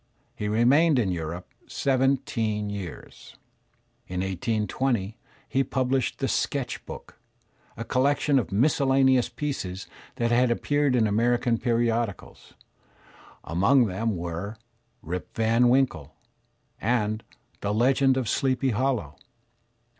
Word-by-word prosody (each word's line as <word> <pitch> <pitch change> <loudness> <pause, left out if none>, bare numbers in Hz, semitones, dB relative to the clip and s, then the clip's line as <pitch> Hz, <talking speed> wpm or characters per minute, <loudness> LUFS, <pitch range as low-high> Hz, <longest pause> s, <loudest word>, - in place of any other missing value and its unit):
He 105 - -3
remained 130 +8 +4
in 105 -6 +1
Europe 85 +1 -5
seventeen 125 -6 0
years. 95 -5 -9 0.7
In 90 0 -3
1820 110 +2 -1 0.3
he 135 - +1
published 130 0 -1
"The - - -1
Sketch - - -2
Book," - - -10 0.6
a 115 - -4
collection 140 +3 +2
of 115 - -4
miscellaneous 130 +2 +3
pieces 95 -11 -4 0.3
that 120 0 0
had 125 +1 +3
appeared 145 +3 +1
in 115 -3 +3
American 115 +2 +1
periodicals. 115 -3 -2 0.9
Among 100 - +3
them 105 +1 -2
were 85 +6 -5 0.5
"Rip 90 +2 -6
Van 115 +2 +3
Winkle," 125 - +1 0.7
and 110 -1 0 0.4
"The 100 - -2
Legend 130 +4 +3
of 130 -4 -1
Sleepy 130 +2 +1
Hollow." 110 - -1
115 Hz, 110 wpm, -26 LUFS, 100-130 Hz, 0.9 s, remained